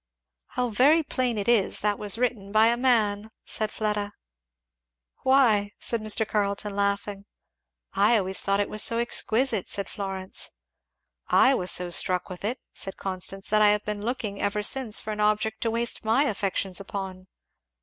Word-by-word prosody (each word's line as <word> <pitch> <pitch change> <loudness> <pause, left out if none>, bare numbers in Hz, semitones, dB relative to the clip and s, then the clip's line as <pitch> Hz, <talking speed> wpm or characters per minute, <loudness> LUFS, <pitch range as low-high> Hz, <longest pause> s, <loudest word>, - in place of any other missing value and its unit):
'" 60 +1 -61
"How 250 -1 0
very 285 +9 +4
plain 255 -5 -2
it 205 - -3
is 230 -5 +2
that 205 -1 0
was 210 +1 -3
written 230 -5 -2
by 220 +2 +5
a 235 - +2
man!" 220 -4 +1 0.2
said 215 -1 -2
Fleda. 210 -1 -2 1.1
"Why?" 225 -7 +3
said 235 -2 -2
Mr. 215 0 0
Carleton 200 -1 -2
laughing. 200 0 -2 0.7
"I 215 +4 +4
always 190 -2 -1
thought 195 0 +1
it 205 - +1
was 215 - -1
so 230 - +3
exquisite!" 235 -2 +1
said 200 - -2
Florence. 190 -1 -3 0.8
"I 265 - +5
was 185 -8 -1
so 180 -1 +1
struck 180 +1 +2
with 180 0 -9
it," 235 +6 -1 0.2
said 195 - -6
Constance, 195 +1 -3
"that 215 0 +4
I 210 - +7
have 210 0 +1
been 210 -1 -4
looking 220 -4 -3
ever 210 +1 -1
since 235 -1 +1
for 215 - -5
an 210 - -5
object 215 +1 0
to 230 - 0
waste 230 +1 0
my 225 +6 +3
affections 195 -6 -1
upon." 190 -1 -7
210 Hz, 170 wpm, -26 LUFS, 200-230 Hz, 1.1 s, I